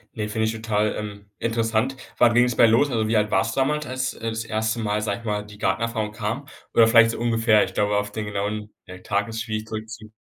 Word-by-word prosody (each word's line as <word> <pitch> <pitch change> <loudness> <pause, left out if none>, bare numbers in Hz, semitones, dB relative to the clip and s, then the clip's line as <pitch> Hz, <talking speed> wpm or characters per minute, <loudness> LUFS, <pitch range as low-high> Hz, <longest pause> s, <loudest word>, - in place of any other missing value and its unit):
Ne, 105 -1 -3
finde 110 +1 0
ich 110 - -1
total, 110 -1 -1
ähm, 100 -1 -7
interessant. 115 +2 0 0.2
Wann 120 -1 +5
ging's 120 0 +3
bei - - +6
los? 115 +6 +4
Also, 110 -4 0
wie 110 0 +2
alt 105 0 +1
warst 105 +4 +1
damals, 150 +3 +1
als, 130 +1 -2
äh, 115 - -4
das 110 0 -4
1. 110 +1 -1
Mal, 105 -1 -1
sage 100 -1 -2
ich 115 - -14
mal, 105 -1 -2
die 105 0 -13
Gartenerfahrung 105 +2 -1
kam? 115 +6 -4 0.3
Oder 115 -1 +6
vielleicht 115 0 +6
so - - -6
ungefähr. 115 -2 +3
Ich - - -5
glaube, 105 0 +1
auf 105 0 -2
den 110 0 -4
genauen 105 +1 -3 0.3
Tag 100 -1 0
ist 110 0 -4
schwierig 110 -1 -4
zurückzu 110 0 -7
110 Hz, 230 wpm, -23 LUFS, 105-115 Hz, 0.3 s, bei